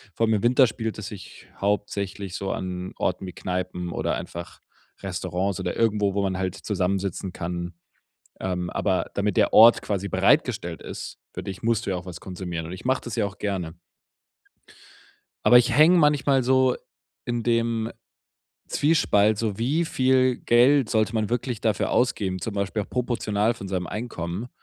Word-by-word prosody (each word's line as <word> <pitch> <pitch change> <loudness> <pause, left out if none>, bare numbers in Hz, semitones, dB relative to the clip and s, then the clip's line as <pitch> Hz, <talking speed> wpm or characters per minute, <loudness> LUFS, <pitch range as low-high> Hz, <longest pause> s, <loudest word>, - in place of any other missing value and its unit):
vor 115 - +2
allem 110 - +2
im 105 - -2
Winter 125 +2 +5
spielt 110 -1 -4
es 105 -2 -6
sich 100 -3 -11
hauptsächlich 100 -2 -2
so 95 -1 -3
an 90 0 -4
Orten 90 +1 -1
wie 90 - -7
Kneipen 90 -1 -4
oder - - -1
einfach 85 0 -7 0.4
Restaurants 95 +1 -2
oder 90 -1 -3
irgendwo, 105 -3 +2
wo 100 - +1
man 95 -1 -1
halt 95 -1 -2
zusammensitzen 95 -1 -2
kann. 85 0 -4 0.7
Ähm, 90 -1 -2
aber 95 -3 -1
damit 100 -1 0
der - - +3
Ort 115 +2 +8
quasi 100 -1 -2
bereitgestellt 85 0 +1
ist - - -7 0.2
für - - -6
dich, 95 -1 -7
musst 115 -1 0
du 95 - -1
ja - - 0
auch 90 - -8
was 90 -1 -8
konsumieren 90 -3 -5
und 85 - -7
ich 90 +6 -9
mache 130 0 +1
das 120 -1 -5
ja 110 -3 +1
auch 100 -1 -7
gerne. 90 -5 -3 1.7
Aber 125 - +8
ich 120 +2 +2
hänge 170 +4 +7
manchmal 140 -3 +3
so 130 0 +3 0.5
in 120 -1 -2
dem 115 -1 0 0.8
Zwiespalt, 110 -9 +3
so: 110 -3 -2
wie 145 +9 +1
viel 130 -3 +2
Geld 125 +1 +4
sollte 110 +1 +1
man 110 -2 0
wirklich 120 -1 -2
dafür 105 -2 0
ausgeben, 95 -7 0
zum 105 +2 -4
Beispiel 100 +1 -1
auch - - -11
proportional 115 -3 0
von 95 -3 -8
seinem 90 -2 -2
Einkommen. 100 +1 -5
105 Hz, 170 wpm, -25 LUFS, 95-120 Hz, 1.7 s, Ort